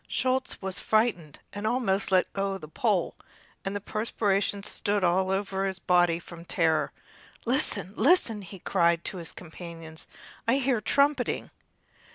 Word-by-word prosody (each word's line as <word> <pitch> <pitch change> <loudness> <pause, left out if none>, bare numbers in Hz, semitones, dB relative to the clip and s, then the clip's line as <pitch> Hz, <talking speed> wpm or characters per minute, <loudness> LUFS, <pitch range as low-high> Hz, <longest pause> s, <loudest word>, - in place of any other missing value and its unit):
Schulz 260 0 0
was 190 -1 -3
frightened 215 -9 +1 0.2
and 205 +1 -3
almost 210 -5 +1
let 185 -1 +3
go 195 0 -1
the 155 -5 -10
pole, 195 +2 0 0.5
and 195 +1 -3
the - - -1
perspiration 205 -1 0
stood 205 -1 0
all 185 +2 +3
over 195 0 -1
his 190 -1 -1
body 175 -2 +3
from 170 0 -11
terror. 165 -2 +1 0.5
"Listen, 230 - +1
listen!" 230 - +4
he 195 +1 -10
cried 170 -2 +2
to - - -4
his 170 -2 -7
companions; 165 -1 -9 0.4
"I 230 - +4
hear 265 -2 +2
a - - -4
trumpeting!" 280 +6 +2
195 Hz, 150 wpm, -28 LUFS, 175-215 Hz, 0.5 s, listen